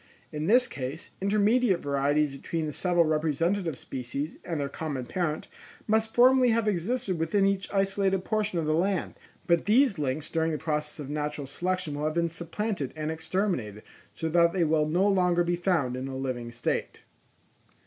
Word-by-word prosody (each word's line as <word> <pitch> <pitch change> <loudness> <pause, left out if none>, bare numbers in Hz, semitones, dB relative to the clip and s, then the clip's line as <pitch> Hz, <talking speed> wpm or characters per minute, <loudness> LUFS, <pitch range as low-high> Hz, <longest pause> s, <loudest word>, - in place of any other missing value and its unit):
In 150 +1 -3
this 245 +4 +5
case, 140 - -6
intermediate 210 0 +3
varieties 145 +1 +1
between 160 +3 -3
the 150 - -4
several 175 0 +2
representative 160 +2 0
species 135 +5 -5
and 165 -3 -3
their 140 - -1
common 140 -3 -4
parent, 155 +2 -2 0.4
must 220 0 +1
formerly 255 +1 +6
have 225 -1 +2
existed 195 -1 -1
within 180 +5 +2
each 195 0 0
isolated 195 -1 +1
portion 215 -4 0
of 165 - 0
the 155 - +1
land, 180 +3 0 0.3
but 170 -2 +2
these 225 - +4
links 145 +2 -1
during 165 0 0
the - - -1
process 150 -1 -3
of 145 -2 -6
natural 150 -1 -3
selection 180 +3 -2
will 145 +1 -3
have 155 +1 -1
been 170 0 +1
supplanted 170 - -4
and 155 0 -3
exterminated, 160 - -2 0.3
so 160 - -3
that 170 +1 +4
they 185 -3 +2
will 155 -1 +2
no 180 +5 +3
longer 180 -3 +3
be 175 0 0
found 175 -8 0
in 130 +1 -4
a 135 -1 -5
living 125 -3 -4
state. 120 0 -3
165 Hz, 175 wpm, -28 LUFS, 150-195 Hz, 0.4 s, formerly